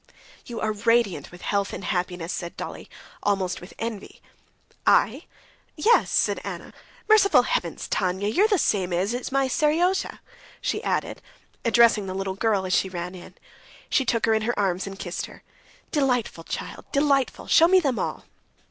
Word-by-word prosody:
"You 235 Hz, -2 st, -5 dB
are 215 Hz, -, 0 dB
radiant 210 Hz, -7 st, +1 dB
with 175 Hz, -, -13 dB
health 200 Hz, -1 st, -1 dB
and -, -, -6 dB
happiness!" 180 Hz, -2 st, -2 dB
said 170 Hz, -1 st, -6 dB
Dolly, -, -, -7 dB, 0.3 s
almost 195 Hz, -3 st, 0 dB
with 180 Hz, -, -12 dB
envy. 225 Hz, -3 st, -6 dB, 0.7 s
"I?... -, -, +3 dB, 0.5 s
Yes," 440 Hz, +10 st, +3 dB
said -, -, +1 dB
Anna. -, -, -7 dB, 0.3 s
"Merciful 425 Hz, -2 st, +6 dB
heavens, -, -, -2 dB
Tanya! 190 Hz, +1 st, -1 dB
You're 370 Hz, -, +3 dB
the 415 Hz, -3 st, +2 dB
same 185 Hz, -, +1 dB
age 190 Hz, +6 st, 0 dB
as 245 Hz, +2 st, -4 dB
my 275 Hz, 0 st, +2 dB
Seryozha," 330 Hz, +8 st, +1 dB, 0.4 s
she -, -, -2 dB
added, -, -, -2 dB, 0.4 s
addressing 230 Hz, -3 st, +4 dB
the 185 Hz, -, -4 dB
little 195 Hz, 0 st, -2 dB
girl 200 Hz, -1 st, 0 dB
as 185 Hz, -, -1 dB
she 190 Hz, -, +2 dB
ran 180 Hz, 0 st, -5 dB
in. 180 Hz, -1 st, -12 dB, 0.6 s
She 270 Hz, -, +3 dB
took 230 Hz, -2 st, +1 dB
her 225 Hz, -, +3 dB
in 220 Hz, -, +2 dB
her 240 Hz, +3 st, -1 dB
arms 190 Hz, -1 st, 0 dB
and 195 Hz, 0 st, -7 dB
kissed 175 Hz, -2 st, -4 dB
her. -, -, -15 dB, 0.5 s
"Delightful 250 Hz, -, 0 dB
child, -, -, -6 dB
delightful! 280 Hz, -2 st, +1 dB
Show 330 Hz, -, +6 dB
me 375 Hz, +1 st, +6 dB
them 275 Hz, -8 st, 0 dB
all." -, -, -3 dB
215 Hz, 165 wpm, -25 LUFS, 190-275 Hz, 0.7 s, Merciful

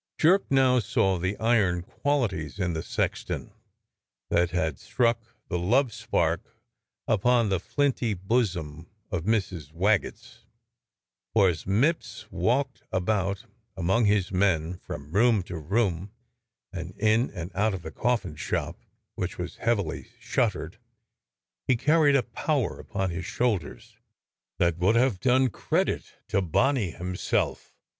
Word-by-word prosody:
Jerk 185 Hz, +5 st, +4 dB
now 130 Hz, -2 st, +4 dB
saw 95 Hz, -3 st, +1 dB
the 95 Hz, +4 st, -2 dB
iron 100 Hz, -6 st, +2 dB
qualities 105 Hz, -, -1 dB
in 90 Hz, -3 st, -1 dB
the 80 Hz, -, -2 dB
sexton -, -, -3 dB, 0.8 s
that 85 Hz, 0 st, +3 dB
had 80 Hz, -3 st, -1 dB
struck 115 Hz, -2 st, +1 dB, 0.3 s
the 90 Hz, -, -2 dB
love 120 Hz, +7 st, +2 dB
spark -, -, -1 dB, 0.5 s
upon 115 Hz, +1 st, +3 dB
the 95 Hz, -2 st, +1 dB
flinty 125 Hz, -, 0 dB
bosom 90 Hz, -6 st, -1 dB, 0.2 s
of 90 Hz, -4 st, -2 dB
Mrs. 95 Hz, -9 st, -1 dB
Waggetts, 95 Hz, +5 st, -1 dB, 1.0 s
for 100 Hz, -4 st, +6 dB
as 80 Hz, -3 st, -4 dB
Mipps 110 Hz, -, 0 dB
walked 130 Hz, +3 st, 0 dB
about 100 Hz, +2 st, 0 dB, 0.3 s
among 95 Hz, +6 st, +2 dB
his 100 Hz, -3 st, +2 dB
men, 90 Hz, -3 st, +1 dB
from 70 Hz, +1 st, -8 dB
room 110 Hz, +1 st, +4 dB
to 90 Hz, -2 st, -6 dB
room, 95 Hz, +2 st, 0 dB, 0.6 s
and 90 Hz, 0 st, -6 dB
in 110 Hz, +4 st, +3 dB
and 90 Hz, -1 st, -7 dB
out 105 Hz, +1 st, +1 dB
of 90 Hz, -, -8 dB
the 80 Hz, -, -6 dB
coffin 120 Hz, -9 st, -1 dB
shop, 75 Hz, -, -3 dB, 0.4 s
which -, -, -4 dB
was -, -, -5 dB
heav 115 Hz, -1 st, +2 dB
ily 95 Hz, -6 st, -4 dB
shuttered, 105 Hz, -5 st, -1 dB, 0.9 s
he 130 Hz, -, +4 dB
carried 150 Hz, +2 st, +4 dB
a 135 Hz, -, +3 dB
power 125 Hz, +2 st, -1 dB
upon 95 Hz, -3 st, -3 dB
his 85 Hz, +1 st, -5 dB
shoulders 95 Hz, -, -2 dB, 0.6 s
that 85 Hz, -1 st, +1 dB
would 95 Hz, +6 st, +3 dB
have 120 Hz, -5 st, +3 dB
done 130 Hz, +1 st, +3 dB
credit -, -, -1 dB, 0.2 s
to 100 Hz, -, +2 dB
Boney 110 Hz, -, +1 dB
himself. 90 Hz, +2 st, -2 dB
100 Hz, 135 wpm, -27 LUFS, 90-120 Hz, 1.0 s, for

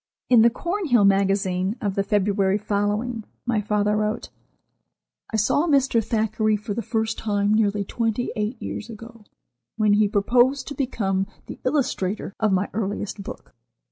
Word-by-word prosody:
In 240 Hz, -3 st, +8 dB
"The 235 Hz, -, +7 dB
Cornhill 310 Hz, -, +1 dB
Magazine" 195 Hz, 0 st, +2 dB
of 205 Hz, -5 st, -1 dB
the 200 Hz, -, 0 dB
February 200 Hz, -1 st, +1 dB
following, 210 Hz, +3 st, -1 dB, 0.2 s
my 235 Hz, -3 st, +1 dB
father 210 Hz, 0 st, +1 dB
wrote: 215 Hz, +2 st, -2 dB, 1.0 s
"I 220 Hz, -, 0 dB
saw 285 Hz, +10 st, +2 dB
Mr. 270 Hz, -6 st, +3 dB
Thackeray 215 Hz, 0 st, +1 dB
for 210 Hz, 0 st, -5 dB
the 235 Hz, -, -2 dB
first 225 Hz, 0 st, -2 dB
time 205 Hz, -1 st, +1 dB
nearly 210 Hz, -2 st, +2 dB
twenty 225 Hz, +3 st, -2 dB
eight 215 Hz, +3 st, -2 dB
years 220 Hz, -, -6 dB
ago, 230 Hz, 0 st, -11 dB, 0.5 s
when 215 Hz, -2 st, +3 dB
he 210 Hz, 0 st, +4 dB
proposed 245 Hz, +6 st, +2 dB
to -, -, -5 dB
become 195 Hz, -9 st, -1 dB, 0.2 s
the -, -, -9 dB
illustrator 215 Hz, -8 st, -1 dB
of 215 Hz, -2 st, +2 dB
my 190 Hz, +1 st, +1 dB
earliest 205 Hz, -1 st, -3 dB
book. -, -, -9 dB
215 Hz, 150 wpm, -23 LUFS, 200-230 Hz, 1.0 s, In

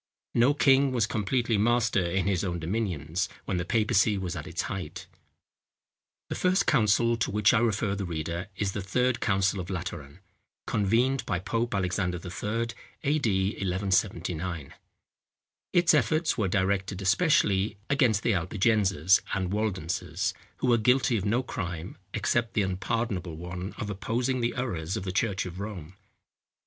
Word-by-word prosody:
No 125 Hz, +5 st, +4 dB
king 135 Hz, -1 st, +4 dB
was 120 Hz, -4 st, +2 dB
completely 115 Hz, +1 st, 0 dB
master 115 Hz, -3 st, +2 dB
in 90 Hz, +2 st, 0 dB
his 95 Hz, -3 st, +1 dB
own 90 Hz, -3 st, -2 dB
dominions, 85 Hz, -2 st, -2 dB, 0.2 s
when 95 Hz, -, -1 dB
the 85 Hz, -, -1 dB
papacy 105 Hz, -1 st, +2 dB
was 90 Hz, -2 st, -3 dB
at 85 Hz, +1 st, -6 dB
its 85 Hz, -1 st, -3 dB
height. 95 Hz, -2 st, -5 dB, 1.2 s
The -, -, -2 dB
first 185 Hz, +1 st, +2 dB
council 115 Hz, -2 st, +3 dB
to 115 Hz, -, 0 dB
which 105 Hz, +1 st, +3 dB
I 115 Hz, -, +4 dB
refer 110 Hz, -3 st, +1 dB
the 100 Hz, 0 st, -3 dB
reader 85 Hz, +1 st, -4 dB
is 100 Hz, 0 st, -1 dB
The 100 Hz, -, -4 dB
Third 125 Hz, +6 st, +1 dB
Council 95 Hz, -2 st, +1 dB
of 90 Hz, 0 st, -5 dB
Lateran, 85 Hz, -5 st, -6 dB, 0.5 s
convened 120 Hz, +6 st, +1 dB
by 90 Hz, -, 0 dB
Pope 115 Hz, +5 st, -2 dB
Alexander 90 Hz, -1 st, 0 dB
III., 105 Hz, +6 st, -3 dB, 0.3 s
A.D. 110 Hz, -10 st, +1 dB
1179. 90 Hz, -5 st, -1 dB, 1.0 s
Its 175 Hz, -2 st, +4 dB
efforts 155 Hz, 0 st, +2 dB
were 105 Hz, -4 st, 0 dB
directed 95 Hz, 0 st, 0 dB
especially 105 Hz, -, +2 dB
against 125 Hz, -7 st, +2 dB
the 115 Hz, -, +2 dB
Albigenses 95 Hz, -1 st, +2 dB
and 95 Hz, -1 st, -1 dB
Waldenses, 95 Hz, -5 st, -1 dB, 0.2 s
who -, -, -1 dB
were 120 Hz, -1 st, +4 dB
guilty 125 Hz, +2 st, +3 dB
of 100 Hz, -2 st, -1 dB
no 120 Hz, +5 st, +1 dB
crime, 90 Hz, -7 st, -5 dB, 0.2 s
except 115 Hz, -2 st, 0 dB
the 105 Hz, -, +3 dB
unpardonable 95 Hz, -2 st, -2 dB
one 90 Hz, +3 st, -6 dB
of 105 Hz, -, -4 dB
opposing 120 Hz, +6 st, -1 dB
the 120 Hz, 0 st, 0 dB
errors 95 Hz, -9 st, -2 dB
of -, -, -4 dB
the 95 Hz, -, -3 dB
church 100 Hz, 0 st, 0 dB
of 90 Hz, 0 st, -7 dB
Rome. 95 Hz, -5 st, -6 dB
100 Hz, 150 wpm, -28 LUFS, 90-115 Hz, 1.2 s, No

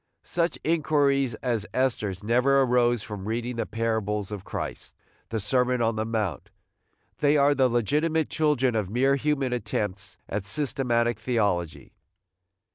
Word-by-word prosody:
Such 170 Hz, 0 st, -1 dB
inquiries 140 Hz, -5 st, +2 dB
as 115 Hz, -5 st, -1 dB
Esther's 110 Hz, -7 st, 0 dB
never 125 Hz, +5 st, +3 dB
arose 120 Hz, -2 st, +2 dB
from 105 Hz, -2 st, -7 dB
reading 120 Hz, +2 st, -3 dB
the 115 Hz, -, -2 dB
parables 110 Hz, -3 st, -2 dB
of 100 Hz, -3 st, -5 dB
Christ, -, -, -6 dB, 0.3 s
the 110 Hz, -, -2 dB
Sermon 125 Hz, +4 st, +1 dB
on 115 Hz, -1 st, +1 dB
the 110 Hz, 0 st, -1 dB
Mount: 105 Hz, -8 st, -2 dB, 0.7 s
they 145 Hz, 0 st, +4 dB
are 145 Hz, 0 st, +4 dB
the 130 Hz, -2 st, +3 dB
legitimate 150 Hz, +7 st, +1 dB
children 145 Hz, -5 st, +1 dB
of 105 Hz, -4 st, -1 dB
mere 135 Hz, +5 st, +2 dB
human 140 Hz, -2 st, 0 dB
attempts 105 Hz, -4 st, -3 dB
at 105 Hz, 0 st, -3 dB
systematic 120 Hz, 0 st, 0 dB
theology. 105 Hz, -9 st, -1 dB
120 Hz, 135 wpm, -26 LUFS, 105-135 Hz, 0.7 s, they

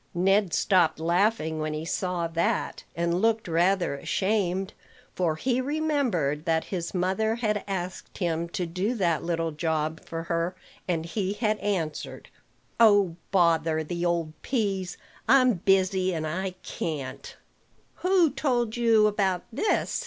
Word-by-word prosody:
Ned 195 Hz, +1 st, +3 dB
stopped 170 Hz, -4 st, +3 dB
laughing 170 Hz, -1 st, +1 dB
when 155 Hz, 0 st, -2 dB
he 155 Hz, +1 st, -4 dB
saw 180 Hz, 0 st, -1 dB
that, 165 Hz, +1 st, -1 dB
and 170 Hz, +1 st, 0 dB
looked 225 Hz, -2 st, +1 dB
rather 175 Hz, +1 st, +2 dB
ashamed; 190 Hz, +4 st, -1 dB, 0.4 s
for 170 Hz, -4 st, 0 dB
he 250 Hz, +9 st, 0 dB
remembered 255 Hz, -, 0 dB
that 160 Hz, -1 st, +1 dB
his 175 Hz, 0 st, -3 dB
mother 190 Hz, +5 st, +1 dB
had 215 Hz, -3 st, -1 dB
asked 185 Hz, -2 st, -5 dB
him 170 Hz, -2 st, -1 dB
to 180 Hz, +1 st, -2 dB
do 185 Hz, +8 st, -2 dB
that 170 Hz, -7 st, +1 dB
little 165 Hz, -1 st, -1 dB
job 155 Hz, 0 st, -2 dB
for 165 Hz, 0 st, -5 dB
her, 170 Hz, +2 st, -1 dB, 0.3 s
and 165 Hz, -3 st, -1 dB
he 190 Hz, +3 st, -2 dB
had 215 Hz, 0 st, 0 dB
answered, 165 Hz, -7 st, -3 dB, 0.5 s
"Oh, 205 Hz, -6 st, +5 dB
bother 165 Hz, -3 st, +2 dB
the 170 Hz, +2 st, -4 dB
old 170 Hz, -3 st, 0 dB
peas! 195 Hz, -7 st, -1 dB, 0.3 s
I'm 255 Hz, 0 st, +6 dB
busy, 185 Hz, 0 st, +2 dB
and 155 Hz, -1 st, -2 dB
I 185 Hz, +4 st, -3 dB
can't." 140 Hz, -6 st, -5 dB, 0.6 s
"Who 365 Hz, -4 st, +3 dB
told 245 Hz, -5 st, 0 dB
you 230 Hz, -3 st, +4 dB
about 195 Hz, -4 st, +1 dB
this?" 315 Hz, -, 0 dB
185 Hz, 140 wpm, -27 LUFS, 165-210 Hz, 0.6 s, I'm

